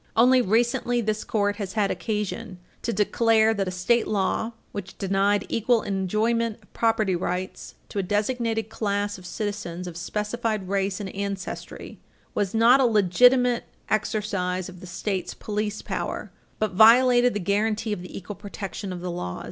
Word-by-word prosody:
Only 250 +2 +6
recently, 240 +3 +1
this 215 -1 -1
Court 205 -1 0
had 200 0 -1
occasion 210 +2 -3 0.2
to 235 - -1
declare 220 +1 +3
that 195 -3 -1
a - - 0
state 185 +6 +1
law 215 +3 0 0.2
which 200 -3 -7
denied 195 +1 +1
equal 230 0 +2
enjoyment 215 +4 0
of - - -27
property 220 -4 +2
rights 180 +1 -4
to 205 - -3
a - - +3
designated 220 +3 -1
class 205 -2 -2
of 180 - -11
citizens 190 -4 -4
of 175 -2 -7
specified 210 +2 -2
race 195 0 -1
and 195 -2 -6
ancestry 200 -1 -5 0.3
was 205 0 -1
not 235 +4 +6
a 265 - +4
legitimate 240 +4 +4 0.3
exercise 200 -4 -1
of 180 -1 -12
the 185 - -10
state's 190 +1 -3
police 210 0 -3
power, - - -4 0.3
but 215 -2 0
violated 245 +4 +6
the - - 0
guaranty 210 +3 0
of 190 - -5
the 180 - -8
equal 195 +2 -7
protection 200 -1 -6
of 180 -1 -6
the 180 0 -3
laws. 170 - -4
210 Hz, 155 wpm, -25 LUFS, 190-225 Hz, 0.3 s, Only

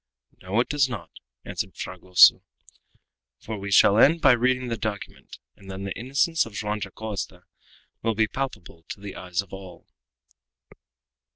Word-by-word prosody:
"No, 95 +5 -1
it - - -2
does 145 -3 +1
not," 120 -4 -7 0.3
answered - - -5
Fragoso; 90 -1 +5 1.0
"for 110 - -7
we 100 +1 -6
shall 100 +2 +5
end 160 +7 +6
by 135 - +6
reading 125 +1 +1
the 115 - -1
document, 105 -2 -6 0.2
and 95 - -15
then 95 0 -6
the 100 -1 -4
innocence 140 +7 +1
of 115 - -10
Joam 105 +1 -2
Dacosta 105 +1 -6 0.6
will 115 -1 0
be 110 +1 +3
palpable 105 -11 -6
to - - -7
the 100 -1 -8
eyes 90 +1 -3
of 100 - -19
all." 95 -2 -10
105 Hz, 155 wpm, -25 LUFS, 95-125 Hz, 1.0 s, end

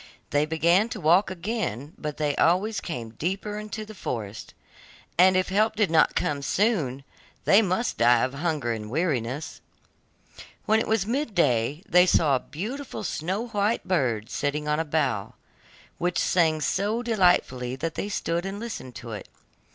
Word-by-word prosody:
They 145 +1 +2
began 170 +7 +3
to - - -5
walk 175 +6 +4
again, 175 - -4
but 150 -1 -5
they 150 -2 0
always 195 +6 +2
came 120 -9 -5
deeper 195 - -3
into 215 0 -6
the 215 - -10
forest, 110 - -6 0.6
and 185 +1 +5
if 185 - 0
help 215 +3 +2
did 210 -6 +1
not 165 - +4
come 145 -1 0
soon, 145 - 0 0.4
they 200 - +6
must 200 +4 -1
die 120 0 +5
of 130 +1 -1
hunger 150 -5 -1
and 105 -2 -4
weariness. 145 -1 -2 1.0
When 220 +1 +3
it - - -2
was 220 -3 +1
mid 240 -1 -2
day, 140 0 +1
they 180 0 +5
saw 150 -6 +4
a - - +1
beautiful 225 - -6
snow 190 +7 -3
white 210 +1 0
bird 120 - 0
sitting 150 +1 -2
on 150 +1 +1
a 165 - 0
bough, 145 -10 -1 0.6
which 175 0 0
sang 160 -3 +2
so 205 - 0
delightfully 175 - +2
that 160 +5 -3
they 205 - -4
stood 170 -4 -1
still 195 - -3
and 200 +1 -6
listened 220 - -7
to 115 -1 -8
it. 105 - -7
170 Hz, 165 wpm, -26 LUFS, 140-205 Hz, 1.0 s, they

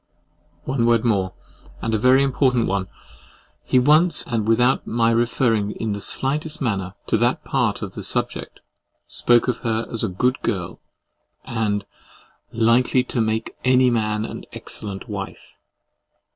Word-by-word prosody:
— - - -38
One 130 -3 0
word 115 0 +3
more, 95 -5 +1 0.4
and 115 - -2
a 110 - +2
very 130 +4 +5
important 130 -3 +2
one. 95 -1 -1 0.8
He - - +1
once, 150 +6 +4
and 110 -3 -2
without 120 +3 +2
my 115 0 +2
referring 115 -3 +1
in 110 -2 -3
the 100 - -5
slightest 150 +7 -1
manner 100 -7 -2
to - - +1
that - - +1
part - - 0
of - - -6
the - - -7
subject, - - -3 0.4
spoke 120 0 +3
of 125 -2 -1
her 115 -1 -1
as 115 - -2
a 110 - 0
GOOD 125 +8 0
GIRL, 95 -7 -3 0.6
and 105 -3 -1 0.7
LIKELY 120 +3 +3
TO 125 -1 -2
MAKE 110 0 -2
ANY 130 0 +4
MAN 110 -2 0
AN - - -7
EXCELLENT 100 +1 -7
WIFE! 100 -3 -7
115 Hz, 150 wpm, -22 LUFS, 105-125 Hz, 0.8 s, very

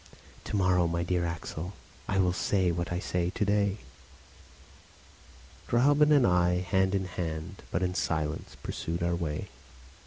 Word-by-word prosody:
"To - - -3
morrow, 90 -3 +3 0.2
dear 85 0 0
Axel, 85 +2 -5 0.3
I 95 - 0
will 90 -2 +3
say 95 -1 +1
what 85 +1 -3
I 85 - 0
say 90 -1 -1
to 105 - -1
day." 100 0 +2 1.9
Gräuben 145 +5 +4
and 140 -4 +6
I, 90 0 +3
hand 95 +1 +1
in 95 -1 0
hand, 90 0 -5
but 90 - -1
in 90 0 0
silence, 80 -3 -2
pursued 85 +1 -3
our 85 0 +1
way. 80 -4 -3
90 Hz, 145 wpm, -29 LUFS, 85-95 Hz, 1.9 s, and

